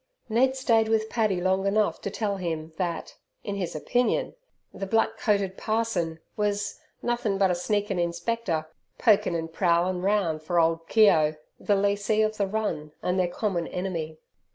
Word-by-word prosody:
Ned 260 Hz, +4 st, +3 dB
stayed 230 Hz, -4 st, +3 dB
with 220 Hz, 0 st, +1 dB
Paddy 215 Hz, -6 st, +1 dB
long 190 Hz, +2 st, +1 dB
enough 210 Hz, +1 st, +1 dB
to -, -, -3 dB
tell 205 Hz, 0 st, -2 dB
him 165 Hz, -3 st, -4 dB
that, 175 Hz, -3 st, -3 dB, 0.3 s
in 205 Hz, -, -3 dB
his 180 Hz, -4 st, -3 dB
opinion, 245 Hz, +10 st, 0 dB, 0.4 s
the 195 Hz, -, -5 dB
black 225 Hz, +3 st, +2 dB
coated 200 Hz, -3 st, +1 dB
parson 215 Hz, -8 st, -1 dB, 0.2 s
was 205 Hz, -1 st, -1 dB, 0.2 s
"nothin' 235 Hz, -4 st, 0 dB
but 195 Hz, -2 st, +3 dB
a -, -, +2 dB
sneakin' 200 Hz, +1 st, -1 dB
Inspector, 170 Hz, -1 st, -1 dB, 0.3 s
pokin' 205 Hz, -6 st, +3 dB
an' 165 Hz, -1 st, -3 dB
prowlin' 175 Hz, +1 st, +1 dB
roun' 190 Hz, -5 st, +1 dB
fur 170 Hz, +3 st, 0 dB
ole 165 Hz, 0 st, +3 dB
Keogh" 165 Hz, -4 st, +4 dB, 0.2 s
the 205 Hz, -, +2 dB
lessee 205 Hz, +2 st, +2 dB
of 215 Hz, 0 st, -1 dB
the 200 Hz, -, +1 dB
run, 190 Hz, -8 st, -3 dB
and 180 Hz, +1 st, +1 dB
their 180 Hz, -, +3 dB
common 175 Hz, -2 st, -2 dB
enemy. 170 Hz, -4 st, -4 dB
195 Hz, 160 wpm, -26 LUFS, 170-215 Hz, 0.4 s, Keogh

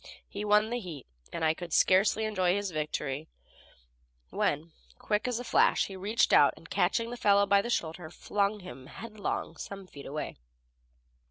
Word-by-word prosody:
He 205 Hz, -, -6 dB
won 210 Hz, +1 st, +3 dB
the 245 Hz, -, -1 dB
heat, 165 Hz, -, -8 dB, 0.3 s
and 165 Hz, -1 st, -2 dB
I 155 Hz, -, +4 dB
was 170 Hz, -2 st, -2 dB
scarcely 200 Hz, +3 st, +4 dB
enjoying 185 Hz, -4 st, +1 dB
his 205 Hz, -2 st, -2 dB
victory 150 Hz, -1 st, -3 dB, 1.0 s
when, 155 Hz, +3 st, -1 dB, 0.3 s
quick 210 Hz, +2 st, -1 dB
as 245 Hz, -2 st, -1 dB
a -, -, -5 dB
flash, 235 Hz, -, +3 dB
he 195 Hz, -, -8 dB
reached 205 Hz, +5 st, +1 dB
out -, -, +6 dB
and -, -, -14 dB
catching 230 Hz, -1 st, 0 dB
the 245 Hz, -, -5 dB
fellow 200 Hz, -2 st, +4 dB
by 200 Hz, 0 st, +4 dB
the 235 Hz, -, -5 dB
shoulder 165 Hz, -6 st, -2 dB
flung 205 Hz, +4 st, -1 dB
him 130 Hz, -6 st, -10 dB
headlong 215 Hz, +3 st, -5 dB
some 195 Hz, -1 st, -7 dB
feet 145 Hz, -6 st, -11 dB
away. 150 Hz, +2 st, -5 dB
200 Hz, 170 wpm, -30 LUFS, 160-210 Hz, 1.0 s, out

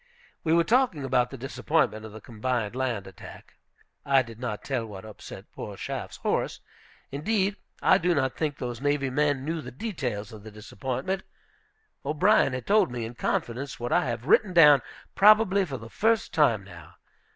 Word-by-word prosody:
We 160 Hz, -, 0 dB
were 170 Hz, +1 st, +5 dB
talking 225 Hz, -, +2 dB
about 125 Hz, -2 st, +1 dB
the 135 Hz, -, -8 dB
disappointment 125 Hz, -4 st, -1 dB
of -, -, -12 dB
the 110 Hz, +1 st, -10 dB
combined 120 Hz, -1 st, -3 dB
land 125 Hz, -6 st, -2 dB
attack. 95 Hz, -, -13 dB, 0.5 s
I 135 Hz, -2 st, +4 dB
did 115 Hz, -2 st, -12 dB
not 120 Hz, -4 st, -4 dB
tell 130 Hz, -4 st, -2 dB
what 100 Hz, -1 st, -9 dB
upset 110 Hz, -2 st, -10 dB
poor -, -, -8 dB
Schaff's -, -, -5 dB
horse; -, -, -1 dB, 0.5 s
indeed, 195 Hz, +7 st, 0 dB, 0.3 s
I 190 Hz, -, +5 dB
do 175 Hz, -1 st, +1 dB
not 130 Hz, -3 st, 0 dB
think 150 Hz, -3 st, -2 dB
those 120 Hz, -1 st, -5 dB
navy 145 Hz, -2 st, 0 dB
men 145 Hz, -1 st, +1 dB
knew 165 Hz, +1 st, -2 dB
the 125 Hz, -, -8 dB
details 125 Hz, -, -4 dB
of 110 Hz, -, -10 dB
the 110 Hz, -, -10 dB
disappointment. 130 Hz, -, -4 dB, 0.8 s
O'Brien 155 Hz, +2 st, +3 dB
had 130 Hz, -, -4 dB
told 210 Hz, -5 st, +4 dB
me, 120 Hz, -2 st, -4 dB
in 115 Hz, -, -7 dB
confidence, 120 Hz, +3 st, -3 dB
what 120 Hz, +1 st, -4 dB
I -, -, +3 dB
have 120 Hz, -1 st, -4 dB
written 190 Hz, +5 st, +3 dB
down 150 Hz, -6 st, +7 dB, 0.3 s
probably 205 Hz, -1 st, +5 dB
for 140 Hz, -6 st, -5 dB
the 115 Hz, -, -10 dB
first 225 Hz, -, 0 dB
time 120 Hz, -, +3 dB
now. 85 Hz, -5 st, -13 dB
135 Hz, 175 wpm, -27 LUFS, 115-165 Hz, 0.8 s, down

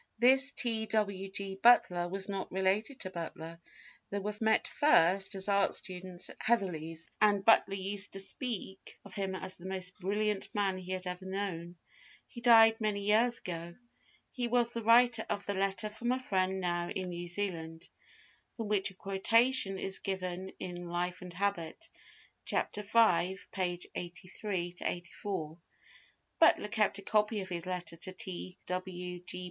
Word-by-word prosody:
This 265 Hz, +4 st, +5 dB
T. 225 Hz, -4 st, -1 dB
W. 200 Hz, -3 st, 0 dB
G. 195 Hz, 0 st, -5 dB
Butler 180 Hz, -7 st, +5 dB
was 190 Hz, +1 st, -2 dB
not 195 Hz, -1 st, -4 dB
related 195 Hz, +8 st, 0 dB
to 185 Hz, -, -3 dB
Butler, 165 Hz, -1 st, -7 dB, 0.5 s
they 200 Hz, -, -2 dB, 0.2 s
met 220 Hz, 0 st, +3 dB
first 195 Hz, -, +3 dB
as 190 Hz, 0 st, -2 dB
art 200 Hz, -1 st, +3 dB
students 185 Hz, -1 st, -5 dB
at -, -, -15 dB
Heatherley's, 170 Hz, -8 st, -1 dB
and 205 Hz, -2 st, +4 dB
Butler 220 Hz, -3 st, +5 dB
used 200 Hz, +1 st, -2 dB
to 195 Hz, -, -5 dB
speak 195 Hz, -2 st, -3 dB
of 200 Hz, -, -12 dB
him 190 Hz, -1 st, -2 dB
as 185 Hz, 0 st, -2 dB
the 180 Hz, -, -9 dB
most 185 Hz, -1 st, -2 dB
brilliant 205 Hz, +2 st, -1 dB
man 195 Hz, -2 st, +1 dB
he 185 Hz, 0 st, -8 dB
had 185 Hz, 0 st, -4 dB
ever 180 Hz, +1 st, -5 dB
known. 185 Hz, -3 st, -4 dB, 0.5 s
He 235 Hz, -, -11 dB
died 225 Hz, -2 st, +7 dB
many 210 Hz, -2 st, 0 dB
years 225 Hz, +4 st, +3 dB
ago. 170 Hz, -1 st, -6 dB, 0.6 s
He 245 Hz, -2 st, -2 dB
was 240 Hz, 0 st, +2 dB
the 235 Hz, -, -2 dB
writer 230 Hz, 0 st, +5 dB
of 200 Hz, -, -2 dB
the 200 Hz, -, -1 dB
"letter 195 Hz, +1 st, 0 dB
from 230 Hz, +3 st, -3 dB
a 255 Hz, -, +1 dB
friend 190 Hz, -6 st, 0 dB
now 175 Hz, -1 st, -1 dB
in 185 Hz, -1 st, -3 dB
New 175 Hz, 0 st, -5 dB
Zealand," 170 Hz, -3 st, -3 dB, 0.7 s
from 225 Hz, -3 st, -4 dB
which 205 Hz, -2 st, +2 dB
a 195 Hz, -, -16 dB
quotation 195 Hz, +2 st, +2 dB
is 190 Hz, 0 st, -3 dB
given 190 Hz, -1 st, -4 dB
in 175 Hz, -1 st, -6 dB
Life 180 Hz, +1 st, -2 dB
and 180 Hz, -1 st, -8 dB
Habit, 200 Hz, -, -2 dB, 0.6 s
Chapter 210 Hz, -, -1 dB
V 200 Hz, -4 st, +3 dB, 0.2 s
(pp. 180 Hz, -2 st, -2 dB
83, 180 Hz, 0 st, -5 dB
84). 175 Hz, -2 st, -4 dB, 0.8 s
Butler 320 Hz, -9 st, +5 dB
kept 210 Hz, -2 st, +1 dB
a 200 Hz, -, -9 dB
copy 210 Hz, 0 st, +2 dB
of 190 Hz, -, -7 dB
his 175 Hz, -1 st, -4 dB
letter 180 Hz, -2 st, -4 dB
to 185 Hz, +3 st, -7 dB
T. 185 Hz, 0 st, -6 dB
W. 180 Hz, -1 st, -4 dB
G. 180 Hz, -, -6 dB
190 Hz, 160 wpm, -32 LUFS, 180-210 Hz, 0.8 s, died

